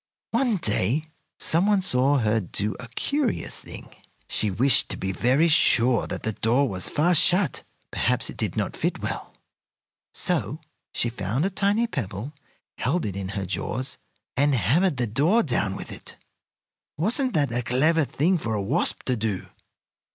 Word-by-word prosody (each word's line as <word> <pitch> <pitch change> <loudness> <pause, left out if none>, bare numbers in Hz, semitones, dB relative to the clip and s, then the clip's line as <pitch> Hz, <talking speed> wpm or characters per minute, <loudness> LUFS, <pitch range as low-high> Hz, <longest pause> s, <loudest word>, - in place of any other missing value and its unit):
One 235 -2 +1
day 135 - 0 0.3
some 170 +5 +2
one 205 -2 +3
saw 135 -3 +4
her 110 -2 +2
do 105 +2 -3
a 125 - -8
curious 280 -6 -1
thing. - - -11 0.3
She 105 - +1
wished 125 +8 +2
to - - -4
be 95 - -3
very 130 - +2
sure 125 -6 +3
that - - -6
the 110 - 0
door 120 +7 +2
was 95 -5 -2
fast 165 +2 +4
shut. 180 -4 +2 0.3
Perhaps - - +1
it - - -12
did - - -3
not - - -2
fit - - -2
well. - - -5 0.8
So - - -1 0.3
she 120 - -1
found 115 - -2
a 195 - 0
tiny 200 +4 +2
pebble, 120 - -5 0.5
held 165 +7 0
it 100 -3 -4
in 95 -1 -4
her 100 - -2
jaws, 130 +8 -3 0.4
and 145 +1 +3
hammered 140 - +2
the 120 - 0
door 150 - +2
down 110 - 0
with - - -8
it. - - -9 0.8
Wasn't 245 - +1
that 145 -5 +1
a 120 +1 -1
clever 155 +7 +2
thing 165 +6 +1
for 115 -6 -2
a - - -1
wasp 100 - 0
to 125 - 0
do? 110 -4 -3
130 Hz, 165 wpm, -25 LUFS, 110-170 Hz, 0.8 s, saw